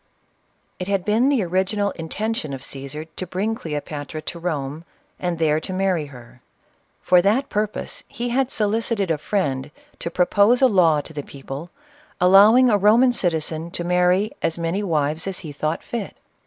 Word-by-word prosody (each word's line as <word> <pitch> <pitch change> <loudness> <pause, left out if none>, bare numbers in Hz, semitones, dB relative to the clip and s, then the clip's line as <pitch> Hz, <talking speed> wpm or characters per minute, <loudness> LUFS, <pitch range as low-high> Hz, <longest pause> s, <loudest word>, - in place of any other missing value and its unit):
It 180 - -4
had 195 -2 0
been 225 +6 +3
the 270 -7 +2
original 190 +3 0
intention 165 -2 -3
of 135 - -10
Caesar 140 +3 -7
to 170 +3 -7
bring 200 +6 -1
Cleopatra 150 -4 -5
to 170 - -6
Rome, 155 -3 -3 0.4
and 175 -2 -2
there 155 -1 +2
to 185 - -6
marry 185 -5 0
her. 125 -2 -14 0.6
For 180 -1 +5
that 230 +9 +1
purpose, 210 0 -2
he 245 -3 -4
had 260 +1 +1
solicited 215 -4 0
a 155 - 0
friend 145 -7 -1 0.3
to - - -4
propose'a 205 +9 +4
law 175 - +4
to 160 - -12
the 145 - -4
people, 140 +4 -8 0.5
allowing 205 +8 +7
a 210 -4 +3
Roman 225 +6 +5
citizen 165 -5 -1
to 175 - -5
marry 180 +4 +2
as 165 - 0
many 170 +4 -1
wives 155 -3 -1
as 190 -2 -3
he 150 - -6
thought 155 +2 -3
fit. 235 -4 -5
180 Hz, 165 wpm, -22 LUFS, 155-210 Hz, 0.6 s, allowing